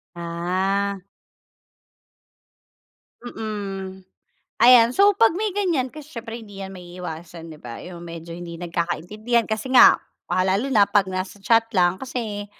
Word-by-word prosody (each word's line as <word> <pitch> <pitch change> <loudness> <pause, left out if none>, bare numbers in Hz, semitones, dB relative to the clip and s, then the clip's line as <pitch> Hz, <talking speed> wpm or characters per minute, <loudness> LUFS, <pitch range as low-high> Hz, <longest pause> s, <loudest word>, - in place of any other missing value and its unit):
Ah. 185 +4 -1 2.3
Mm. 195 -5 -6 0.6
Ayan, 240 0 +7
so 400 +1 +6
pag 230 +8 +5
may 425 +3 -1
ganiyan 350 -10 0
kasi 305 +2 -12
siyempre 230 0 -6
hindi 205 -3 -10
'yan 190 - -7
maiiwasan, 175 -2 -9
'di 155 - -11
ba? 120 -4 -9
Yung 175 -1 -9
medyo 165 0 -9
hindi 170 0 -7
nagkakaintindihan 175 +7 -2
kasi 220 +5 -2
nga, - - +8 0.3
ah, 185 +1 +2
lalo 200 +9 0
na 205 -5 +5
pag 195 -2 +2
nasa 185 +2 -5
chat 225 +1 +3
lang 180 0 +3
kasi 220 -6 -5
195 Hz, 135 wpm, -23 LUFS, 175-230 Hz, 2.3 s, nga